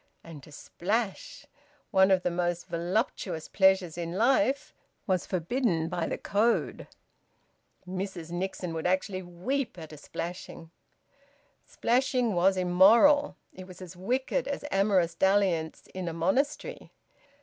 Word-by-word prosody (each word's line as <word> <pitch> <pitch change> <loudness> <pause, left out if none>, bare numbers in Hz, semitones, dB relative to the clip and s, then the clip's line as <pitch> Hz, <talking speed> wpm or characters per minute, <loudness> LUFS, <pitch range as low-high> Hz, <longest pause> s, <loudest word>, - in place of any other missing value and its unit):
And 165 -4 -11
to 150 - -15
splash 215 - -3 0.5
one 190 -2 +5
of 185 -2 +3
the 180 - 0
most 175 0 -1
voluptuous 175 - -2
pleasures 190 -4 +2
in 170 0 -4
life 270 +6 +1 0.3
was 185 -3 0
forbidden 175 -2 0
by 165 -1 -2
the - - -3
code. 220 +4 0 1.0
Mrs 185 -3 -5
Nixon 180 -1 -4
would 160 +1 -2
actually 185 +1 -1
weep 185 +8 -3
at 160 -2 -9
a - - -10
splashing. 165 +1 -7 1.0
Splashing 250 -2 +1
was 185 +2 +3
immoral. 215 +12 +5 0.2
It 185 0 -10
was 185 -1 -12
as 185 -1 -10
wicked 260 - -1
as - - -4
amorous 195 -4 +2
dalliance 185 -4 +1
in 185 -1 -5
a 165 - -3
monastery. 195 - -1
185 Hz, 125 wpm, -28 LUFS, 175-215 Hz, 1.0 s, one